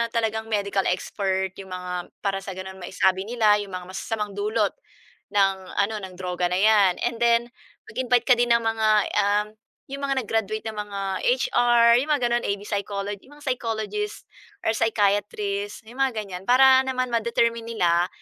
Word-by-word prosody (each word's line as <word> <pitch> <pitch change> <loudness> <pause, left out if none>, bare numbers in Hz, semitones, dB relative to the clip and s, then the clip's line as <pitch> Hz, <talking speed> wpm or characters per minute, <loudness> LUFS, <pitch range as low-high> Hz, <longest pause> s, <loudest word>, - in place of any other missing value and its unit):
talagang 220 -1 -1
medical 200 -2 0
expert, 190 +1 -1
'yong 195 - -9
mga 180 -1 -5 0.2
para 195 -1 0
sa 195 -1 -7
ganun 190 0 -8
masabi 190 +1 0
nila 215 -3 +3
'yong 205 -1 -6
mga 180 -1 -6
masasamang 210 +2 -3
dulot 210 +2 0 0.6
ng 195 -1 +4 0.2
ano, 205 +2 +1
ng 190 -2 -9
droga 180 -1 -2
na 180 - -1
'yan 205 -3 +5
and 240 -1 -1
then 235 0 +3 0.4
mag-invite 245 -2 +1
ka 250 - +7
din 240 0 +2
ng 235 - +1
mga, 225 -1 +1 0.3
um, 205 +1 +2 0.4
'yong 275 - -5
mga 270 -2 0
nag-graduate 215 0 -2
ng 220 -1 -6
mga 205 -1 -5 0.3
HR, 240 -1 +4
'yong 280 - -2
mga 290 -4 +1
gano'n 240 0 +1
AB 200 0 -2
psychology, 200 0 -4
'yong 290 - -16
mga 295 - -14
psychologist 240 - -3 0.4
or - - +2
psychiatrist, 205 -1 0
'yong 235 +4 -13
mga 265 -3 +1
ganiyan. 185 -2 -8
Para 260 +1 +7
naman 255 -1 -1
ma-determine 235 0 +1
nila 175 -6 +2
210 Hz, 170 wpm, -24 LUFS, 195-235 Hz, 0.6 s, ka